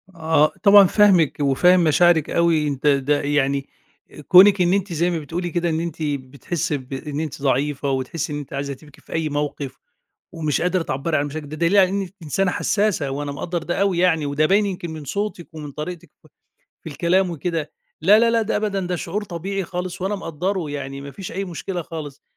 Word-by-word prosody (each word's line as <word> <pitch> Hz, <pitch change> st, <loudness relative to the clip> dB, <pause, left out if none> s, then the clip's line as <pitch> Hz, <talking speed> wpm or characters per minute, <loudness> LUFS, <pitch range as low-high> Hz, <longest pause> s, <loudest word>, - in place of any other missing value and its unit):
آه، 160 Hz, -2 st, +2 dB
طبعًا 200 Hz, -1 st, +9 dB
فاهمِك 185 Hz, -7 st, +4 dB
وفاهم 175 Hz, +6 st, +4 dB
مشاعرِك 160 Hz, 0 st, +4 dB
أوي، 165 Hz, -3 st, +2 dB
أنتِ 140 Hz, 0 st, -2 dB
ده 145 Hz, 0 st, +2 dB
يعني 140 Hz, -1 st, 0 dB, 0.6 s
كونِك 190 Hz, +1 st, +7 dB
إن 175 Hz, +1 st, +3 dB
أنتِ 195 Hz, -2 st, -1 dB
زي 170 Hz, +2 st, +1 dB
ما 170 Hz, -2 st, -1 dB
بتقولي 170 Hz, +4 st, -4 dB
كده 175 Hz, 0 st, -1 dB
إن 160 Hz, 0 st, -1 dB
أنتِ 165 Hz, -2 st, -4 dB
بتحسّي 145 Hz, +2 st, -3 dB
بإن 135 Hz, +2 st, -6 dB
أنتِ 155 Hz, -4 st, -5 dB
ضعيفة 140 Hz, +1 st, 0 dB
وتحسّي 135 Hz, +4 st, -3 dB
إن -, -, -3 dB
أنتِ 145 Hz, -, -9 dB
عايزة 140 Hz, 0 st, -3 dB
تبكي 145 Hz, +1 st, -17 dB
في -, -, -12 dB
أي 160 Hz, -1 st, -1 dB
موقف، 145 Hz, -2 st, -3 dB, 0.5 s
ومش 155 Hz, -4 st, -1 dB
قادرة 180 Hz, +1 st, +1 dB
تعبّري 155 Hz, +3 st, -1 dB
عن 145 Hz, -, 0 dB
مشاعرِك، 145 Hz, +1 st, -6 dB
ده 150 Hz, -, -7 dB
دليل 170 Hz, +5 st, +2 dB
على 190 Hz, -2 st, +6 dB
إنك 195 Hz, -1 st, -3 dB
إنسانة 180 Hz, +5 st, 0 dB
حسّاسة، 200 Hz, -11 st, 0 dB
وأنا 145 Hz, +1 st, -4 dB
مقدّر 165 Hz, +4 st, -4 dB
ده 175 Hz, +4 st, -2 dB
أوي 195 Hz, -3 st, +1 dB
يعني، 165 Hz, -4 st, +2 dB
وده 145 Hz, +2 st, +1 dB
باين 200 Hz, +5 st, +3 dB
يمكن 180 Hz, -3 st, -4 dB
من 155 Hz, -1 st, -7 dB
صوتِك 200 Hz, +1 st, -4 dB
ومن 150 Hz, -2 st, -7 dB
طريقتِك 155 Hz, +4 st, -7 dB
في -, -, -21 dB, 0.5 s
في 160 Hz, -, -8 dB
الكلام 175 Hz, +5 st, +1 dB
وكده، 165 Hz, -1 st, -3 dB, 0.3 s
لا، 195 Hz, +7 st, +6 dB
لا، 230 Hz, +1 st, +4 dB
لا 230 Hz, -1 st, +2 dB
ده 220 Hz, -, -1 dB
أبدًا، 210 Hz, -2 st, -1 dB
ده 180 Hz, 0 st, -2 dB
شعور 195 Hz, +5 st, -4 dB
طبيعي 195 Hz, +2 st, -4 dB
خالص 180 Hz, 0 st, -5 dB
وأنا 195 Hz, +2 st, -1 dB
مقدّره 175 Hz, -1 st, -3 dB
يعني 140 Hz, -1 st, -5 dB
مفيش 140 Hz, +7 st, -8 dB
أي 195 Hz, +3 st, -3 dB
مشكلة 180 Hz, 0 st, -5 dB
خالص، 155 Hz, -4 st, -8 dB
165 Hz, 195 wpm, -21 LUFS, 145-185 Hz, 0.6 s, طبعًا